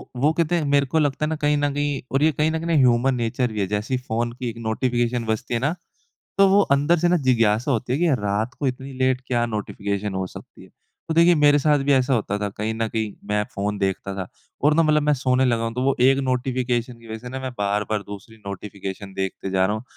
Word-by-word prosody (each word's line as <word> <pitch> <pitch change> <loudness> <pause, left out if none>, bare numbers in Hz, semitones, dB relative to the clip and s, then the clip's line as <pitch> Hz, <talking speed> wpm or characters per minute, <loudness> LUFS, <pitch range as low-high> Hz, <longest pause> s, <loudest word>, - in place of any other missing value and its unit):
वो 140 +5 +2
कहते 170 +1 +1
हैं 165 -3 0
मेरे 140 0 +3
को 160 +4 0
लगता 145 0 0
है - - -2
ना 160 - -1
कहीं 150 -1 +1
न 145 -1 0
कहीं 145 -1 -1
और 135 +2 +2
ये 160 - +5
कहीं 150 +2 +1
न 160 - -1
कहीं 165 - -6
ना 170 - +1
ह्यूमन-नेचर 125 -1 +2
भी 105 - -4
है 100 - 0
जैसे 105 +6 -1
फ़ोन 120 +1 -1
की 125 0 -4
एक 115 - -8
नोटिफ़िकेशन 120 +1 0
बजती 110 +2 -2
है 120 - +1
ना, 145 +7 0 0.6
तो 195 0 +7
वो 195 +1 +5
अंदर 145 +5 +2
से 175 +2 +2
ना 180 - +4
जिज्ञासा 120 -4 +2
होती 125 -1 -1
है 135 - +1
कि 175 +1 +2
रात 105 +4 -1
को 145 - 0
इतनी 130 +1 -4
लेट 130 -1 +2
क्या 120 -2 +1
नोटिफ़िकेशन 100 -2 -3
हो 95 0 -2
सकती - - -13
है? - - -19 0.4
तो 160 - -1
देखिए 170 +2 +6
मेरे 145 -2 +5
साथ 150 +1 +3
भी 140 - +3
ऐसा 130 0 +3
होता 105 -3 -1
था, 105 0 -2
कहीं 105 +2 -3
न 115 0 -1
कहीं 110 -2 -2 0.2
मैं 105 0 +1
फ़ोन 100 +1 -2
देखता 95 0 -2
था 95 -2 -4 0.4
और 150 +1 +5
ना 165 - +4
मतलब 155 -1 +3
मैं 150 0 +2
सोने 130 -1 +1
लगा 120 -2 +1
हूँ 115 0 -3
तो 125 - -2
वो 135 0 +2
एक 135 +2 +5
नोटिफ़िकेशन 125 -2 -1
की 115 - -15
वज़ह 110 0 -5
से 125 +2 -9
ना 130 +1 -5
मैं 130 0 -4
बार-बार 105 +1 -1
दूसरी 100 +3 -10
नोटिफ़िकेशन 100 0 -7
देखते 95 0 -3
जा 95 0 +2
रहा 105 - -1
हूँ 110 - -7
125 Hz, 255 wpm, -23 LUFS, 105-145 Hz, 0.6 s, तो